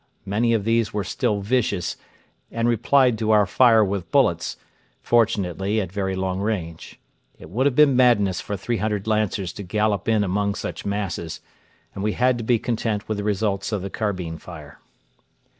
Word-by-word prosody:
Many 115 +4 +1
of 105 - -1
these 115 -1 +1
were 105 -2 -2
still 105 +2 -1
vicious, 105 -5 0 0.6
and 115 0 0
replied 120 +1 +3
to 110 -1 -1
our 105 -2 +5
fire 115 +2 +5
with 95 -3 -4
bullets, - - +1 0.4
fortunately 105 -3 +1
at 95 -5 -3
very 95 -1 -2
long 95 0 -2
range. 95 -6 -4 0.4
It 80 - -13
would 130 +8 +2
have 135 - 0
been 145 -2 +5
madness 105 -8 +3
for 105 -2 -4
300 105 -1 -2
Lancers 105 -4 -1
to - - -8
gallop 105 +1 -1
in 110 -2 +3
among 100 +1 0
such - - -5
masses, 95 -5 -3 0.5
and 95 - -5
we 105 0 0
had 125 -1 +2
to - - -4
be 120 +1 +2
content 115 -3 -2
with 110 -1 -2
the - - -3
results 100 -1 -1
of 100 -4 -2
the 100 - -5
carbine 90 -7 -3
fire. 75 -5 -11
105 Hz, 175 wpm, -23 LUFS, 95-115 Hz, 0.6 s, our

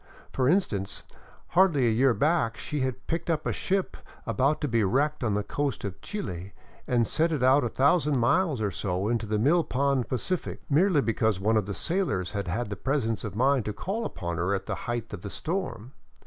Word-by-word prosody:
For 130 0 +2
instance: 105 - 0 0.5
Hardly 170 -7 +4
a 115 - +3
year 125 +2 +3
back 145 -7 +1
she 150 +6 -4
had 130 -1 -2
picked 170 +1 -3
up 155 -2 0
a - - 0
ship 195 0 -1 0.3
about 140 +3 +1
to 150 - 0
be 115 -3 +2
wrecked 140 +9 +1
on 110 -4 +1
the 105 - 0
coast 145 +4 -2
of 95 -3 -6
Chile 95 - -5 0.3
and 120 -2 +2
set 165 +8 +1
it 145 -5 -1
out 130 +3 +5
a 120 - 0
thousand 145 +2 +3
miles 140 +2 +2
or 105 -2 0
so 90 +2 -2
into 115 -2 -1
the 105 0 0
mill 155 +10 +3
pond 140 -2 0
Pacific, 175 +8 -2
merely 165 +1 +4
because 110 -4 +1
one 110 +3 +2
of 105 -3 +1
the 100 - -4
sailors 165 - -1
had 100 -2 -3
had 105 +4 -2
the - - -2
presence 115 -3 -1
of 105 -3 -5
mind 130 +2 +3
to 105 - -2
call 195 - -3
upon 85 - -4
her 90 +4 +1
at 95 - -4
the - - -3 0.2
height 120 -2 -3
of 100 - -6
the 100 - -6
storm. 160 - -4
125 Hz, 210 wpm, -27 LUFS, 105-150 Hz, 0.5 s, out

